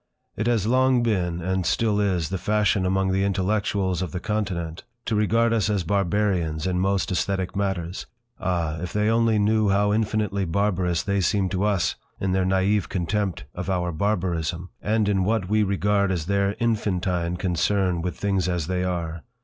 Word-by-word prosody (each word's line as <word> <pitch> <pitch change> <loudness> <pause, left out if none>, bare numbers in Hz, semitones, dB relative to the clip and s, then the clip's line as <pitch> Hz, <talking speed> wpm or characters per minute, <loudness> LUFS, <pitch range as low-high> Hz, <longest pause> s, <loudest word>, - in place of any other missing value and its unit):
It 105 - -2
has 115 -5 +2
long 130 +1 +3
been, 90 -7 0
and 95 +1 0
still 105 +3 +1
is, 90 -6 0
the 95 0 -3
fashion 105 -1 +1
among 95 0 +1
the 95 +1 +1
intellectuals 100 -1 0
of 90 -4 -3
the 90 - -2
Continent 90 -6 -3 0.2
to - - -1
regard 115 +2 +2
us 110 -2 +1
as 100 -4 0
barbarians 90 -4 0
in 90 -1 0
most 95 0 0
aesthetic 95 +1 -1
matters. 95 -3 -2 0.3
Ah! 85 -4 -1
If 90 0 -5
they 105 +1 +2
only 115 -1 +3
knew 105 0 +2
how 105 +1 +2
infinitely 105 -2 0
barbarous 90 -1 0
they 100 -1 0
seem 95 +1 +1
to 95 +2 0
us 100 -4 +1 0.2
in 95 - -1
their 95 0 +1
naive 95 +2 +1
contempt 95 +1 -1
of 90 +2 -5
our 90 -2 0
barbarism, 85 -2 -1
and 110 0 +1
in 95 -2 +2
what 105 -1 0
we 110 +1 +3
regard 100 0 +1
as 85 -4 -2
their 100 +1 +1
infantine 90 -6 0
concern 90 0 0
with 90 +1 -4
things 95 -2 0
as 90 -3 -1
they 90 +2 -1
are. 85 -3 -3
95 Hz, 175 wpm, -24 LUFS, 90-105 Hz, 0.3 s, long